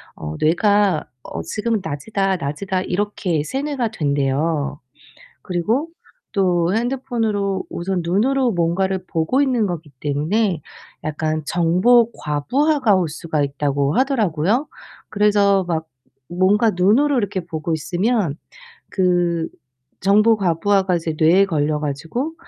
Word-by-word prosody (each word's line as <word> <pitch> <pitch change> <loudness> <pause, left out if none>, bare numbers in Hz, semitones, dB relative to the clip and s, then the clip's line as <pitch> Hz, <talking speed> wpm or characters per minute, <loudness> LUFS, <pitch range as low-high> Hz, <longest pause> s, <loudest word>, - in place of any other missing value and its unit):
어 75 0 -6
뇌가 195 +1 +2 0.2
어 - - -6
'지금은 220 -1 -2
낮이다, 195 +5 -1
낮이다' 185 +5 -3
이렇게 180 -5 -1
세뇌가 270 - -2
된대요. 145 -2 -1 0.6
그리고 220 - -1 0.4
또 180 -2 +1
핸드폰으로 225 -6 -1
우선 180 +1 -2
눈으로 240 +8 +1
뭔가를 185 +2 0
보고 170 - +1
있는 245 -6 +1
것이기 165 -4 -5
때문에 160 +4 0 0.4
약간 155 0 -2
정보 185 +9 +3
과부하가 250 - +1
올 175 -4 0
수가 155 -1 -2
있다고 140 0 0
하더라고요. 230 - +1 0.4
그래서 205 -2 +3
막 160 -2 -2 0.4
뭔가 200 +5 +3
눈으로 230 +10 +3
이렇게 200 -3 -1
보고 160 -1 -3
있으면 175 - 0 0.5
그 175 -3 +1 0.5
정보 210 +3 +4
과부하가 190 0 +1
이제 165 -1 -3
뇌에 180 +5 +5
걸려 150 -3 0
가지고 165 - -3
185 Hz, 270 characters per minute, -20 LUFS, 160-215 Hz, 0.6 s, 뇌에